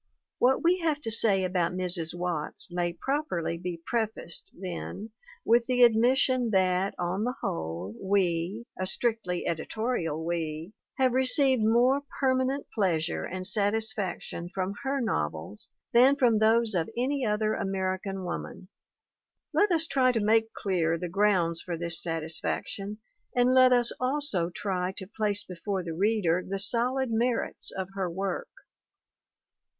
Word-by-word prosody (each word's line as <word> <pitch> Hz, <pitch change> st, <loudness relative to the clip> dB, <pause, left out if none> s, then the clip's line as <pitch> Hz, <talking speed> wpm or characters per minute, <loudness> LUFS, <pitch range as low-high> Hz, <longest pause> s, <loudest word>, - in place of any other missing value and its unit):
What 260 Hz, +2 st, +3 dB
we 355 Hz, +2 st, +3 dB
have 315 Hz, -3 st, 0 dB
to 225 Hz, -, -3 dB
say 210 Hz, -4 st, +4 dB
about 180 Hz, -1 st, 0 dB
Mrs. 180 Hz, -2 st, -2 dB
Watts 175 Hz, +3 st, -3 dB
may 175 Hz, 0 st, -1 dB
properly 185 Hz, -, -2 dB
be 175 Hz, 0 st, -5 dB
prefaced, 220 Hz, -7 st, -3 dB
then, 190 Hz, +4 st, -6 dB, 0.3 s
with 235 Hz, +1 st, +4 dB
the 250 Hz, -1 st, +4 dB
admission 245 Hz, +2 st, +4 dB
that, 185 Hz, 0 st, +2 dB
on 180 Hz, +3 st, -1 dB
the 250 Hz, +2 st, -1 dB
whole, 90 Hz, -, -4 dB
we 190 Hz, +2 st, 0 dB
(a 185 Hz, -, -1 dB
strictly 220 Hz, -4 st, -1 dB
editorial 165 Hz, -2 st, -2 dB
we) 165 Hz, 0 st, -3 dB, 0.3 s
have 260 Hz, -1 st, +3 dB
received 260 Hz, 0 st, +3 dB
more 240 Hz, +5 st, +3 dB, 0.2 s
permanent 260 Hz, +1 st, +1 dB
pleasure 175 Hz, -6 st, 0 dB
and 185 Hz, +1 st, -5 dB
sat 205 Hz, +1 st, +2 dB
isfaction 210 Hz, -6 st, -3 dB
from 190 Hz, 0 st, -2 dB
her 275 Hz, 0 st, -1 dB
novels 80 Hz, -, -3 dB, 0.2 s
than 255 Hz, +4 st, +6 dB
from 240 Hz, -6 st, +3 dB
those 225 Hz, 0 st, +3 dB
of 170 Hz, -3 st, 0 dB
any 270 Hz, +3 st, 0 dB
other 215 Hz, -1 st, +1 dB
American 190 Hz, 0 st, -2 dB
woman. 180 Hz, +1 st, -6 dB, 0.8 s
Let 410 Hz, -1 st, +3 dB
us 330 Hz, -2 st, +4 dB
try 260 Hz, -5 st, +3 dB
to 230 Hz, -, +1 dB
make 220 Hz, +1 st, +2 dB
clear 170 Hz, -5 st, 0 dB
the 175 Hz, +1 st, -5 dB
grounds 180 Hz, -3 st, +2 dB
for 175 Hz, -2 st, -4 dB
this 170 Hz, -1 st, +1 dB
satisfaction 165 Hz, +5 st, -2 dB, 0.4 s
and 250 Hz, +1 st, +4 dB
let 255 Hz, 0 st, +6 dB
us 240 Hz, -1 st, +4 dB
also 255 Hz, -, 0 dB
try 185 Hz, 0 st, -2 dB
to 190 Hz, -, -6 dB
place 205 Hz, 0 st, -1 dB
before 185 Hz, +1 st, -4 dB
the 165 Hz, -1 st, -5 dB
reader 185 Hz, -2 st, +1 dB
the 195 Hz, +1 st, -4 dB
solid 240 Hz, +5 st, +1 dB
merits 235 Hz, +1 st, 0 dB
of 190 Hz, -1 st, -5 dB
her 190 Hz, -2 st, -2 dB
work. 190 Hz, +2 st, -3 dB
200 Hz, 145 wpm, -28 LUFS, 175-240 Hz, 0.8 s, than